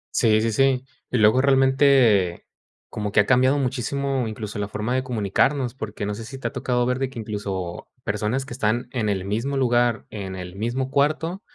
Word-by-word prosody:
Sí, 110 -2 +4
sí, 115 - 0
sí. 130 +2 +2 0.2
Y 125 - 0
luego, 110 +4 +5
realmente, 135 -9 +4 0.4
como 105 -1 -4
que 105 - +3
ha - - -1
cambiado 130 +3 +4
muchísimo, 135 0 -1
incluso, 105 -1 -6
la 100 - -2
forma 110 +4 -3
de 130 - +1
comunicarnos, 125 +3 0
porque 105 -5 -5
no 105 - -2
sé 110 +2 -7
si 135 +4 -8
te - - -3
ha - - -6
tocado 125 -1 0
ver 125 +1 0
de 135 -1 -1
que, 130 - -12
incluso, 100 -5 -5
personas 105 +6 -1
que 125 - -8
están 120 +1 -1
en 110 -5 -1
el 95 -2 -1
mismo 115 +8 -2
lugar, 120 -3 +2
en 95 -3 -6
el 90 0 -8
mismo 125 +5 -2
cuarto, 155 +6 0
120 Hz, 200 wpm, -23 LUFS, 105-130 Hz, 0.4 s, luego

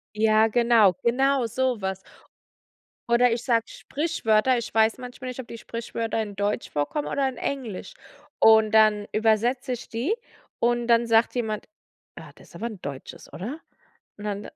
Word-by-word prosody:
Ja, 215 0 +4
genau, 230 -3 +4
genau 265 +1 +2
so 255 +1 -1
was. 190 0 -3 1.1
Oder 240 0 +4
ich 235 +1 -2
sage 230 -4 +1
Sprichwörter. 260 -6 0
Ich 235 - -5
weiß 220 0 +3
manchmal 255 0 -8
nicht, 250 +1 -7
ob 245 - -7
die 230 - -8
Sprichwörter 230 0 -4
in 205 -2 -6
Deutsch 205 +1 -2
vorkommen 150 - -2
oder 275 -1 0
in 260 - -9
Englisch. 265 - -5 0.5
Und 220 -1 +6
dann 215 -1 +4
übersetze 230 +4 +1
ich 240 - -7
die, 250 - -1 0.5
und 240 0 +1
dann 235 0 +3
sagt 225 0 +3
jemand: 220 -4 -3 0.5
„Ah, - - -11
das - - -18
ist - - -17
aber 230 - -5
'n 215 -5 -8
Deutsches, 140 -2 -8
oder?“ 250 - -6 0.6
Und 210 - -9
dann: 205 0 -4
230 Hz, 165 wpm, -25 LUFS, 215-250 Hz, 1.1 s, Und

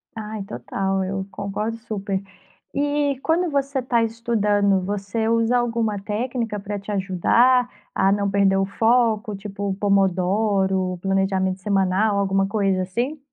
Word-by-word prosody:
Ai 215 -2 -5
total, 190 +7 -2
eu 190 0 -3
concordo 210 +4 -3
super. 205 -4 -3 0.5
E 285 -1 0
quando 335 +2 +1
você 275 -1 0
está 240 -2 +1
estudando 210 -4 +1
você 205 +3 -2
usa 230 +2 +2
alguma 230 -3 0
técnica 225 +1 -3
para 200 0 -5
te 205 +1 -7
ajudar 230 +7 +3 0.3
a 195 +1 +3
não 200 0 +1
perder 195 -1 +3
o 195 - +2
foco 220 0 +1
tipo 200 0 -5
o 195 - 0
pomodoro, 195 -1 +1
planejamento 195 -1 0
semanal, 200 +1 +1
alguma 195 0 +1
coisa 195 -3 +1
assim? 240 +11 -3
205 Hz, 135 wpm, -22 LUFS, 195-230 Hz, 0.5 s, ajudar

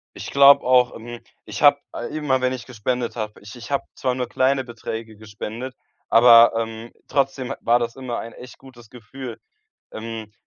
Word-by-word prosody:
Ich - - -7
glaube 140 0 +7
auch, 125 -1 +3
ähm, 120 +1 -9 0.3
ich - - -6
habe - - +6 0.3
immer, 145 -4 0
wenn 130 - +1
ich 130 -2 -7
gespendet 125 0 -3
habe, 105 -1 -5
ich 105 +3 -12
ich 120 +2 -11
habe 140 - 0
zwar 130 -1 -1
nur 125 -1 -3
kleine 130 +1 +1
Beträge 115 -2 -7
gespendet, 110 +4 -7 0.4
aber, 115 0 +8
ähm, 115 0 -5 0.2
trotzdem 135 -2 -1
ha - - -7
war 120 +1 +3
das 120 +1 -4
immer 130 -3 -5
ein 115 - -8
echt 125 0 -13
gutes 120 -4 -16
Gefühl. 125 +1 -10 0.5
Ähm, 110 -1 -7
120 Hz, 180 wpm, -22 LUFS, 115-130 Hz, 0.5 s, aber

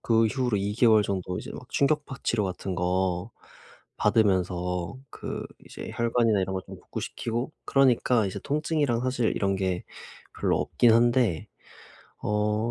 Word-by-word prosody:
그 115 -1 +3
이후로 125 0 0
2 100 +1 -1
개월 110 -2 +5
정도 95 -2 -3
이제 - - -7
막 - - -10
충격파 145 -1 +1
치료 110 -3 +1
같은 95 0 -4
거 90 0 0 0.7
받으면서 90 -3 +1 0.2
그 - - -5 0.2
이제 - - -8
혈관이나 115 -3 +2
이런 95 0 -2
거 95 - -1
좀 - - -11
복구시키고 120 +4 -4
그러니까 125 -4 +3
이제 95 - -4
통증이랑 145 -4 0
사실 125 -2 0
이런 100 -1 0
게 95 -2 -1 0.6
별로 - - +2
없긴 120 -2 +3
한데. 120 -6 +3 0.8
어 105 +2 0
110 Hz, 290 characters per minute, -27 LUFS, 95-120 Hz, 0.8 s, 개월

